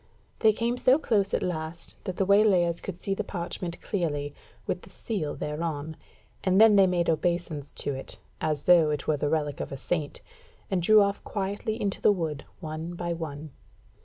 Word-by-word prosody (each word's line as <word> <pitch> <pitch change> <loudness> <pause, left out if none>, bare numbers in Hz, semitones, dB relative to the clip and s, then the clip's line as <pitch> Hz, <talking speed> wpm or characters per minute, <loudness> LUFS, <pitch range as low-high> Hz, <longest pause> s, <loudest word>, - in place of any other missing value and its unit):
They 220 - +6
came 235 +3 -1
so 255 +2 +5
close 210 -10 +1
at - - 0
last 165 -1 -4
that 185 -3 -3
the 195 - +2
waylayers 190 -4 +4
could 190 -3 -6
see 195 - -2
the - - -2
parchment 175 -1 -5
clearly, 145 -7 -2 0.3
with - - -2
the - - -14
seal 195 -10 -3
thereon, 155 0 -3 0.5
and 190 +1 +3
then 220 -1 +8
they 195 -1 +6
made 175 -2 +1
obeisance 165 -3 -1
to 145 - -3
it, 135 - -7 0.2
as 155 -2 -1
though 170 -3 +6
it 150 -2 -2
were 155 - +2
the 145 +1 0
relic 150 -3 -1
of - - -4
a 135 - -4
saint, 150 +1 -3 0.5
and 185 -2 +1
drew 215 +4 +7
off 200 0 -2
quietly 205 +3 -3
into 200 -3 -2
the - - +6
wood 160 -7 -3 0.2
one 160 +1 -5
by 170 0 -2
one. 155 -2 -6
170 Hz, 190 wpm, -27 LUFS, 155-200 Hz, 0.5 s, then